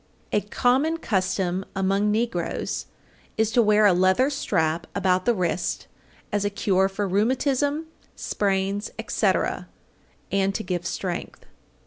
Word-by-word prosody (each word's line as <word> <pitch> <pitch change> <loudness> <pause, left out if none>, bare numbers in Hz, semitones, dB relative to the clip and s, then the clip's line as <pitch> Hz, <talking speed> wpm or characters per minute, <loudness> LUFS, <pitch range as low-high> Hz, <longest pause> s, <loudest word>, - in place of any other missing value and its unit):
A 210 - +2
common 260 +10 +1
custom 190 - -1
among 195 +2 +1
negroes 210 -5 -2 0.5
is 220 0 +2
to 240 - +4
wear 210 -1 +4
a 200 - +6
leather 190 +10 +3
strap 165 - 0
about 185 -2 +1
the 240 - +3
wrist 180 -2 -1 0.5
as 205 -1 0
a 205 - +1
cure 195 -1 +1
for 200 +1 -2
rheumatism, 265 - +1 0.3
sprains, 200 +1 -1
etc., - - 0 0.6
and 195 0 +1
to 220 - -2
give 175 -1 -3
strength. 180 -3 -5
200 Hz, 125 wpm, -24 LUFS, 185-220 Hz, 0.6 s, a